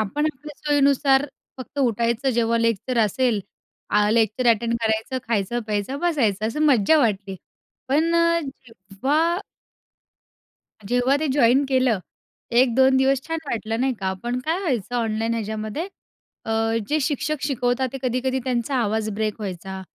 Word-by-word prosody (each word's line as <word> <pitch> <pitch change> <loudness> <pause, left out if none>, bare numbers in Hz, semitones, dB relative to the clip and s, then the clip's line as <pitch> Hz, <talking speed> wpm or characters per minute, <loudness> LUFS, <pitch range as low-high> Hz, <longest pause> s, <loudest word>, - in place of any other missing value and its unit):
आपण 220 +9 -1
आपल्या 295 +2 -12
सोयीनुसार 280 -1 +3 0.3
फक्त 260 +3 -8
उठायचं, 235 +1 +1
जेव्हा 230 -1 +1
लेक्चर 230 +2 0
असेल 225 +1 0 0.5
आ 210 0 +3
लेक्चर 225 +2 +1
अटेंड 230 +1 +2
करायचं, 220 +3 -1
खायचं, 230 +2 0
प्यायचं, 210 +6 -2
बसायचं. 225 - +1
असं 265 +7 -3
मज्जा 270 +3 +4
वाटली. 200 -7 0 0.5
पण 320 +5 +2
अ, 335 0 +3
जेव्हा 270 - -2 1.5
जेव्हा 245 +5 +2
ते 310 - -1
जॉइन 260 0 +4
केलं, 255 -6 +2 0.5
1-2 260 +2 +4
दिवस 265 0 +3
छान 325 +3 -3
वाटलं 225 -3 -3
नाही 265 0 +1
का. 190 -4 -2
पण 240 +1 -2
काय 325 +3 0
व्हायचं 245 - -2
ऑनलाईन 225 0 -1
ह्याच्यामध्ये 215 +5 -3 0.6
अ, - - -5 0.4
जे 305 - +2
शिक्षक 295 +1 -1
शिकवतात 260 -2 0
ते 270 - -5
कधी-कधी 255 +1 0
त्यांचा 250 +1 -1
आवाज 220 -2 0
ब्रेक 215 0 -1
व्हायचा 190 -1 -6
245 Hz, 140 wpm, -23 LUFS, 220-275 Hz, 1.5 s, मज्जा